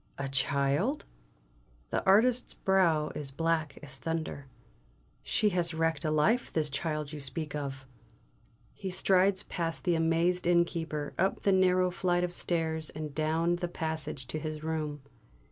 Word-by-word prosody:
"A 140 - -3
child?" 140 - +1 0.9
The - - 0
artist's 235 +6 +4
brow 170 -6 +2
is 145 -2 -4
black 160 0 -1
as 140 -2 -7
thunder. 160 -2 -4 0.7
"She 210 - +2
has 175 -3 -1
wrecked 165 -1 0
a 155 - 0
life, 190 +11 +2
this 155 -2 0
child 150 +1 -2
you 150 - -5
speak 150 +2 -4
of!" 135 -2 -4 0.9
He 195 - -5
strides 190 +1 +3
past 165 -2 -3
the 175 - +2
amazed 165 +2 +2
innkeeper, 165 -4 +1
up 190 +3 +1
the 200 - +3
narrow 185 -1 +4
flight 180 -1 +1
of 175 0 -2
stairs, 160 -3 -1
and 155 -2 -6
down 160 +3 +1
the 175 0 -2
passage 160 -5 -4
to 155 - -2
his 155 0 -5
room. 155 -3 -3
165 Hz, 145 wpm, -30 LUFS, 150-180 Hz, 0.9 s, artist's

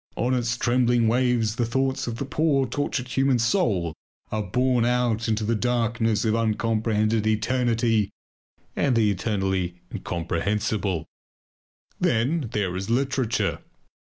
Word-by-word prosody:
On 125 +3 0
its 120 -2 0
trembling 120 -1 +2
waves 120 -2 +1
the 120 - +1
thoughts 130 +2 -1
of 115 - -3
the 140 - -3
poor 140 -1 +1
tortured 130 -1 -2
human 135 0 +2
soul 115 - +1 0.4
are 110 - -1
borne 125 +5 +1
out 120 -2 +1
into 110 -1 0
the 110 +2 +1
darkness 115 -1 0
of 110 - +2
uncomprehended 110 -1 +1
eternity 115 -1 +1 0.7
and 135 -4 +1
the 110 -3 +3
eternally 95 -3 -1 0.2
incomprehensible. 90 +2 -2 0.9
Then 125 +4 +1
there 95 -4 -1
is 95 +3 -4
literature. 130 -1 0
115 Hz, 125 wpm, -25 LUFS, 105-125 Hz, 0.9 s, the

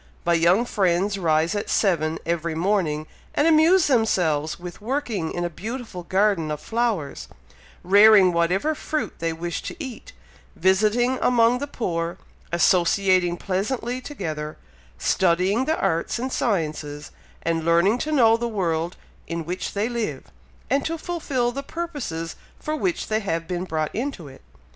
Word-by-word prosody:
My 170 - +3
young 175 +7 +4
friends 195 -1 +1
rise 160 0 +2
at 205 - -3
seven 165 -6 +1
every 170 -1 -1
morning, 165 -4 0 0.3
and 295 - +3
amuse 330 +3 +5
themselves 165 - +1
with 175 +1 -9
working 230 - -2
in 175 - -2
a - - +1
beautiful 220 +2 -6
garden 190 -2 +1
of 150 -1 -3
flowers, 220 -9 -2 0.6
rearing 200 -1 +7
whatever 180 - +1
fruit 310 0 -3
they 165 0 -1
wish 165 +1 -4
to - - -6
eat, 285 - -8 0.4
visiting 215 +7 +2
among 245 0 +4
the 285 - -3
poor, 170 -10 -3 0.3
associating 175 +1 +3
pleasantly 235 +7 -2
together, 155 - -5 0.4
studying 190 +7 +2
the 315 +2 0
arts 165 +7 0
and 255 +2 -3
sciences, 155 - -2 0.3
and 165 -1 0
learning 170 +8 +3
to 310 - -2
know 230 -6 +5
the 235 +1 -2
world 175 -5 -1 0.3
in 165 -1 -4
which 180 +3 -4
they 205 +2 +1
live, 235 -2 -3 0.4
and 275 0 +1
to 330 +1 -2
fulfil 290 -8 -1
the 275 +3 -4
purposes 275 - -5 0.2
for 305 - -3
which 345 +2 -1
they 215 0 +1
have 165 -5 -3
been 180 0 -3
brought 155 -3 -2
into 235 - -4
it. 135 -1 -13
190 Hz, 150 wpm, -23 LUFS, 170-240 Hz, 0.6 s, rearing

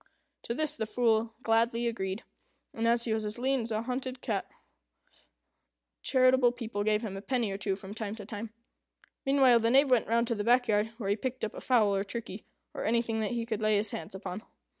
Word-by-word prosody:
To 235 - -2
this 310 +1 -1
the 220 -2 -3
Fool 225 -1 +1
gladly 230 +1 +2
agreed; 200 -2 -2 0.5
and 230 0 -1
as 235 0 +3
he 225 - 0
was 220 0 -1
as 210 +1 -4
lean 265 +1 +1
as 230 0 -5
a 215 +1 -1
hunted 255 +1 -4
cat, 205 -6 -2 1.5
charitable 255 -2 +4
people 230 -4 -4
gave 215 +1 +1
him 200 -3 -4
a 195 - -6
penny 235 -2 -1
or 195 - -3
two 195 -1 -1
from 195 +1 -9
time 215 -1 -4
to 210 -3 -9
time. 215 +1 -6 0.8
Meanwhile, 265 -3 +6
the 230 0 +2
Knave 270 +2 +5
went 245 -3 +4
round 235 +1 +2
to - - +2
the 210 -2 -2
back 245 +2 +4
yard, 210 0 +2
where 200 -4 -2
he - - +3
picked 260 +3 -4
up 215 - -6
a - - -8
fowl, 215 -6 +3
or 195 - 0
turkey, 210 -1 -7 0.3
or - - -4
anything 230 0 +1
that 215 +1 -1
he 235 -1 -2
could 220 -2 -3
lay 215 -1 +3
his 205 0 -1
hands 165 +3 -6
upon. 190 +1 -5
225 Hz, 220 wpm, -30 LUFS, 210-245 Hz, 1.5 s, Meanwhile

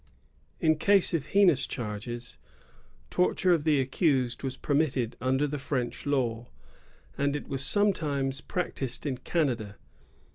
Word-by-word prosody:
In 155 -1 +3
case 200 0 +4
of 155 -3 -1
heinous 185 -9 +4
charges, 120 +1 -6 0.7
torture 180 0 +2
of 160 -3 0
the 150 -3 +3
accused 130 -2 +1
was 130 -1 -4
permitted 140 -5 0
under 130 +3 +1
the 145 0 -3
French 135 -1 -3
law; 120 -4 0 0.7
and 140 +1 +1
it 150 - -5
was 135 -1 -2
sometimes 145 -9 +1
practised 140 -8 -3
in 130 -4 -2
Canada. 125 -10 -1
140 Hz, 130 wpm, -28 LUFS, 125-155 Hz, 0.7 s, case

